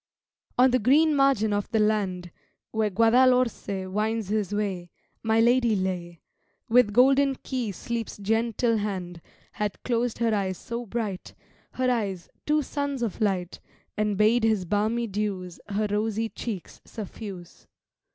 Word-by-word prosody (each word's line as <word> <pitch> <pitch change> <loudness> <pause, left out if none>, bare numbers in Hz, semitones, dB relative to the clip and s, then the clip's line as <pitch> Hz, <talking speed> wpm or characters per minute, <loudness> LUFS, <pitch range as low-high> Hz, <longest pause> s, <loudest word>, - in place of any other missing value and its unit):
On 255 +1 +6
the 255 - +3
green 295 +7 +4
margin 270 -7 +3
of 205 0 -1
the 225 - 0
land, 200 -5 0 0.4
Where 220 -1 +1
Guadalhorce 230 -2 +3
winds 215 +1 -1
his 210 -2 -1
way, 195 -4 -2 0.3
My 225 0 +2
lady 235 -1 +4
lay: 180 -3 -3 0.5
With 240 -2 +4
golden 270 +4 +4
key 250 -5 -2
Sleep's 230 +4 -5
gentle 225 +2 +1
hand 185 -5 -4 0.3
Had 210 -2 -4
closed 240 -1 0
her 230 -1 +1
eyes 190 -3 -1
so 235 0 -6
bright 205 -4 -4 0.4
Her 255 0 +1
eyes, 195 -7 -2 0.2
two 300 0 +2
suns 285 -2 -3
of 225 -3 -3
light 185 -4 -1 0.4
And 210 -2 0
bade 220 +3 +4
his 215 -4 +2
balmy 215 +5 0
dews 195 -4 -3
Her 210 +1 0
rosy 220 +1 0
cheeks 210 -7 -7
suffuse. 200 -4 -9
215 Hz, 140 wpm, -26 LUFS, 195-235 Hz, 0.5 s, On